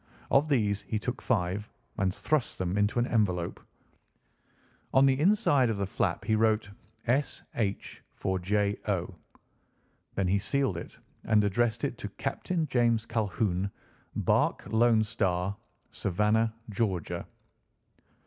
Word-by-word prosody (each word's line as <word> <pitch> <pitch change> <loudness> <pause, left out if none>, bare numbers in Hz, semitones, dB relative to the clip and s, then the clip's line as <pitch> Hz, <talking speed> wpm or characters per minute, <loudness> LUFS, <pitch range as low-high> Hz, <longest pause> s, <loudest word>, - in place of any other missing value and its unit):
Of 145 +3 +4
these 105 -7 +2
he 110 - -3
took 125 +4 -3
five 105 -2 0 0.3
and 95 -3 +1
thrust 150 +7 -1
them 90 0 -1
into 105 +3 +1
an 120 - +3
envelope. 90 -8 0 1.4
On 135 +1 +7
the 135 0 +3
inside 155 - +4
of 110 - -1
the 100 - 0
flap 95 0 -1
he 110 - +1
wrote 110 -1 +2 0.3
"S. 130 +4 0
H. 100 -4 -3
for 95 -1 -1
J. 100 +2 0
O." 95 -2 -1 1.0
Then 95 -2 +1
he 100 +2 +2
sealed 135 - 0
it 85 - -8 0.3
and 110 -2 +4
addressed 115 +3 +1
it 120 - -2
to 105 - -5
"Captain 160 - -2
James 120 -5 +2
Calhoun, 100 -4 0 0.5
Barque - - +1
Lone 115 -1 +4
Star, 95 -4 -1 0.4
Savannah, 105 +4 +1 0.2
Georgia." 95 -5 -2
110 Hz, 130 wpm, -29 LUFS, 100-120 Hz, 1.4 s, On